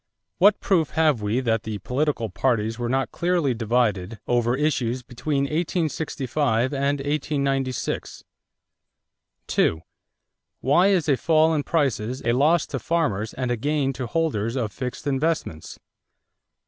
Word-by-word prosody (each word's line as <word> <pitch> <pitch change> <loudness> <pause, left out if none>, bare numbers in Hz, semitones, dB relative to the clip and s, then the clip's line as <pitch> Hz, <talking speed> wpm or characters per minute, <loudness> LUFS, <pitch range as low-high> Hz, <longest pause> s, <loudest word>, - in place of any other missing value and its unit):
What 205 +3 +5
proof 170 -6 +1
have 155 -8 +3
we 105 +5 0
that 115 -3 +1
the 110 -1 -5
political 130 +3 -1
parties 115 0 0
were 120 -1 -2
not 135 +1 0
clearly 170 -6 +1
divided 110 -3 0
over 120 0 +2
issues 130 -4 0
between 135 +4 -2
1865 150 -5 -1
and 140 +1 0
1896? 140 -2 -2 1.2
2. 80 - +1 0.8
Why 170 +9 +4
is 185 -6 +2
a 140 -3 +3
fall 160 +1 +3
in 150 - +1
prices 130 -5 -1
a 115 - +3
loss 150 +6 +3
to 135 - -4
farmers 115 -12 -1
and 130 -2 -2
a - - +2
gain 140 +2 0
to 125 -1 -5
holders 115 -7 -1
of 115 -5 -1
fixed 125 +5 -6
investments? 140 - -2
135 Hz, 135 wpm, -24 LUFS, 120-155 Hz, 1.2 s, What